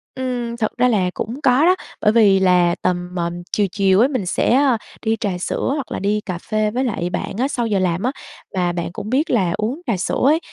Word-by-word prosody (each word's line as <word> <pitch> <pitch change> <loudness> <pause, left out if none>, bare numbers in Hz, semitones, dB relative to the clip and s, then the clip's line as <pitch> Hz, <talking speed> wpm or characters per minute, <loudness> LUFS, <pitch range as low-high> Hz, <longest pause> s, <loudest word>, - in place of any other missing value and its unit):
Ừm, 245 -2 -3
thật 215 -2 -1
ra 250 0 +4
là 195 -6 +2
cũng 250 +7 -5
có 265 +2 +4
đó, 365 +2 +5 0.3
bởi 210 - +4
vì 205 -4 +5
là 180 -2 +3
tầm, 180 0 -2
ờm, 175 0 -3
chiều 205 -2 +1
chiều 195 -1 +3
ấy 245 - +5
mình 255 -8 -2
sẽ, - - +1
a, 265 -2 +4 0.2
đi 220 -1 +1
trà 190 -4 -2
sữa 180 - -2
hoặc 280 -5 -5
là - - -3
đi 205 +2 0
cà 185 -4 -5
phê 215 +3 -1
với 250 +4 -1
lại 200 -8 -2
bạn 200 - -4
á, 260 - +1
sau 240 -5 -2
giờ 200 -3 +1
làm 180 0 0
á, 255 - +1 0.4
và 180 -2 0
bạn 170 -1 -3
cũng 205 - -6
biết 285 +7 +1
là 190 -8 +2
uống 250 +10 -2
trà 225 - +1
sữa 180 - -2
ấy, 305 +4 +4
215 Hz, 245 wpm, -20 LUFS, 185-250 Hz, 0.4 s, đó